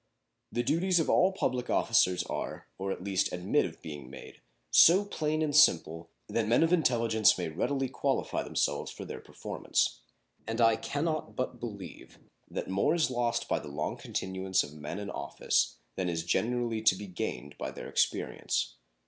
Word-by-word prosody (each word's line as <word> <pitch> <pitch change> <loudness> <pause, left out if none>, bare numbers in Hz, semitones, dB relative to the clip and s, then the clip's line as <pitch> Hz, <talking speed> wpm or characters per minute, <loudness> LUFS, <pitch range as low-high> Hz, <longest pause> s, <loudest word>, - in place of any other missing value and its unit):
The 120 - 0
duties 175 +7 +2
of 160 - +1
all 185 +2 +4
public 125 -10 -2
officers 90 -1 +3
are, - - -5
or 95 0 -2
at 95 - -5
least 95 -1 0
admit 90 +1 +1
of - - -9
being 75 -5 -8
made, 65 - -11 0.3
so 190 +5 +7
plain 155 -5 -1
and 145 -2 -1
simple 80 - +4 0.2
that 115 -2 -1
men 120 +7 +4
of 165 +2 +2
intelligence 115 -9 +3
may 90 -3 -2
readily 135 - -1
qualify 130 - -1
themselves - - -1
for - - -8
their - - -7
performance; - - -2 0.5
and 115 +1 -3
I 115 -1 +5
can 145 +3 -3
not 155 -2 -2
but 130 -1 -3
believe 100 -7 -8 0.3
that - - -4
more 100 - +2
is 160 -6 +1
lost 120 -2 0
by - - +1
the - - -10
long 75 +1 -3
continuance 95 0 -1
of 75 - -9
men 75 +3 -6
in 100 -1 -5
office - - 0 0.2
than 95 -2 0
is 80 -1 -2
generally 115 +4 0
to 110 -4 +5
be 105 +2 -7
gained 85 -5 -5
by - - -3
their - - -8
experience. - - -1
110 Hz, 175 wpm, -30 LUFS, 90-135 Hz, 0.5 s, so